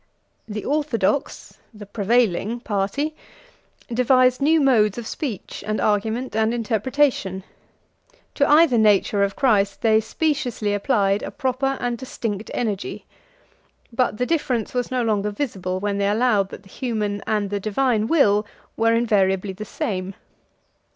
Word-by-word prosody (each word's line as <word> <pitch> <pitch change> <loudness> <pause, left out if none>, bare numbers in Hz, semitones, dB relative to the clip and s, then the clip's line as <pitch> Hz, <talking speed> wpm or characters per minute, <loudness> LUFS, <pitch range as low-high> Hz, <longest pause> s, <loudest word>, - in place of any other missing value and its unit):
The 210 -1 -5
orthodox 285 -4 -1
(the 210 -2 -11
prevailing) 220 +1 +1
party 225 +9 -2 0.8
devised 255 +1 +3
new 315 +3 +4
modes 230 -8 +3
of 240 - -5
speech, 230 - -5
and 215 0 -1
argument, 220 +4 0
and 220 +1 +1
interpretation: 230 -3 0 0.9
to 280 - +1
either 295 -5 +5
nature 205 -1 +3
of 200 0 +1
Christ 205 -7 +2
they 220 -1 +5
speciously 250 -5 -1
applied 205 -2 +1
a - - -5
proper 270 0 -1
and 240 -1 -2
distinct 220 -5 -5
energy; 210 -5 -3 0.9
but 230 -3 0
the 250 - 0
difference 255 -8 -1
was 250 -1 -1
no 255 -2 0
longer 210 -2 0
visible 195 -6 -3
when 200 0 -2
they 200 0 +1
allowed 210 -3 +2
that 195 - -10
the 195 - -18
human 210 -4 -3
and 210 -2 -1
the 205 - -1
divine 220 +1 0
will 210 -10 +3 0.3
were 230 0 +2
invariably 195 -4 +1
the 210 +3 -7
same. 190 -2 -4
220 Hz, 135 wpm, -22 LUFS, 205-255 Hz, 0.9 s, either